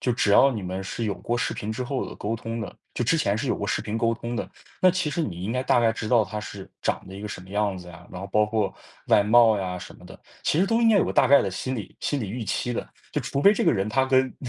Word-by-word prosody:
就 125 - +1
只 110 -3 +2
要 135 +6 +7
你 110 - -4
们 95 +1 -4
是 115 +4 -4
有 105 -2 -1
过 120 +4 -3
视 - - -1
频 105 - -5
之 115 - -3
后 135 +1 -2
的 - - -8
沟 105 +2 -2
通 115 +1 -5
的， 110 - -6 0.2
就 - - -2
之 145 +8 +3
前 100 -10 +1
是 - - -2
有 - - 0
过 - - -4
视 - - 0
频 105 - -4
沟 115 0 +2
通 115 +1 -5
的， - - -3 0.3
那 185 - +6
其 185 -3 -1
实 165 +3 -1
你 90 - -4
应 105 +4 -2
该 125 +1 0
大 125 - +3
概 115 -1 +3
知 115 -1 -5
道 115 -2 +4
他 105 0 -5
是 100 -2 -8
长 - - -1
得 95 - -10
一 100 - -8
个 105 - -5
什 100 - -6
么 90 - -14
样 100 -1 -1
子 90 - -11
呀， 85 0 -13
然 90 - -7
后 95 - -5
包 105 - +4
括 105 -1 -1 0.3
外 - - +5
貌 110 +1 +5
呀 90 -2 -3
什 - - -10
么 - - -17
的， - - -12 0.2
其 150 - +1
实 190 - +3
都 225 +3 +2
应 230 - +5
该 220 - +5
有 195 - +4
个 - - -2
大 130 - +4
概 140 +1 +7
的 - - -1
心 130 +8 -3
理 105 -5 -8
心 145 - -1
理 105 - -4
预 115 +5 -4
期 120 +3 -2
的。 85 - -4 0.2
就 - - 0
除 140 - -2
非 200 +8 +7
这 - - 0
个 - - +4
人 100 -3 -1
他 130 +5 +2
跟 130 0 +2
115 Hz, 345 characters per minute, -25 LUFS, 100-130 Hz, 0.3 s, 要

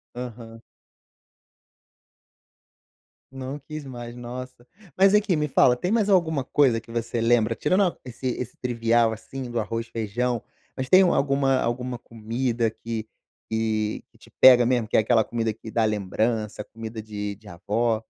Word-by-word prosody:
Aham. 115 -2 -8 2.7
Não 135 +1 -6
quis 155 +1 -8
mais, 120 -2 -8
nossa. 125 0 -8 0.3
Mas 195 +1 +5
aqui, 205 -4 +3
me 150 0 0
fala, 125 -2 +4
tem 180 +9 -2
mais 215 -3 +2
alguma 160 -7 +2
coisa 130 -6 +3
que 115 - -18
você 115 0 -2
lembra, 115 -1 +3
tirando 185 - +2
esse 125 +1 -8
esse 125 -1 -4
trivial, 115 -2 +2
assim, 125 +3 -7
do 120 -1 -1
arroz 115 +1 -3
feijão, 115 +2 -2 0.3
mas 130 -1 -3
tem 185 +5 +7
alguma 140 -5 +2
alguma 125 +1 -2
comida 115 +1 -2
que 115 0 -6 0.4
que 110 -1 -1
que - - -25
te - - -18
pega 125 -2 +9
mesmo, 120 -3 +1
que - - +1
é - - +6
aquela 110 0 +3
comida 115 -2 -2
que 110 +1 -11
dá 115 0 +1
lembrança, 105 +1 -1
comida 110 -1 -8
de 105 -1 -5
de 105 0 -16
avó? 110 +6 0
120 Hz, 155 wpm, -25 LUFS, 110-130 Hz, 2.7 s, pega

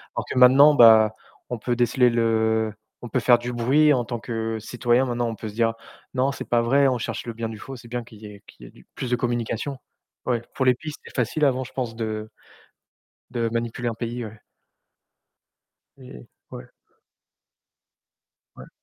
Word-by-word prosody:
alors - - -3
que - - -3
maintenant 140 +4 +7
bah 110 -3 +7 0.4
on 120 - -3
peut 120 +2 -2
déceler 125 +1 +3
le, 110 -2 +1 0.3
on 120 - -7
peut 130 - 0
faire 120 0 +5
du 125 +1 -5
bruit 145 +6 +3
en 125 -2 +1
tant 120 0 -4
que 115 -1 -3
citoyen 120 +3 +1
maintenant 120 -1 -1
on 115 - -5
peut 110 - -7
se - - -11
dire: 115 0 +1 0.4
«Non 130 +2 +1
c'est - - -8
pas 120 -1 +3
vrai» 135 +4 +3
on 125 - 0
cherche 115 - -5
le 120 - -4
bien 115 0 -4
du 110 - -8
faux, 135 - -8
c'est 120 -1 -13
bien 120 0 -4
qu'il 110 -2 -16
y - - -10
ait 100 -1 -12
qu'il - - -15
y - - -12
ait - - -18
du - - -20
plus 125 - -4
de - - +4
communication 120 +2 -3 0.5
ouais, 120 -2 0
pour 130 - -1
les 125 - +5
pistes 155 +2 -8
c'est - - -13
facile 130 +5 0
avant 130 -1 +1
je 130 - -11
pense 120 -4 -4
de 110 -1 -4 1.0
de 120 -2 -1
manipuler 120 +1 -3
un - - -4
pays, 120 0 -5
ouais. 105 0 -11 1.6
Et 125 - -12 0.3
ouais. - - -10 1.9
Ouais. - - -13
120 Hz, 200 wpm, -23 LUFS, 115-125 Hz, 1.9 s, maintenant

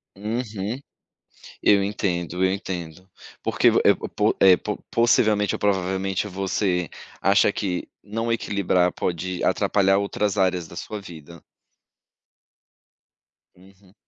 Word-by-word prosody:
Uhum. 110 +1 -4 0.8
Eu 100 -1 +4
entendo, 90 -3 -2
eu 95 - +3
entendo. 90 -2 -6 0.3
Porque - - +3
vo - - +3
eh, - - +6 0.2
po - - +2
eh, 95 -2 +7
po 105 - -4
possivelmente 110 -3 +3
ou - - -7
provavelmente, 95 0 0
você 95 -2 -1 0.3
acha 100 +1 +4
que 95 -4 -3 0.2
não 115 +3 -3
equilibrar 95 -5 +1
pode 90 +1 -3
atrapalhar 95 -1 +2
outras 100 +1 -1
áreas 90 -3 +1
da 85 - -13
sua 105 +4 -6
vida. 85 -3 -12 2.1
Uhum. 95 +1 -21
95 Hz, 115 wpm, -23 LUFS, 90-105 Hz, 2.1 s, eh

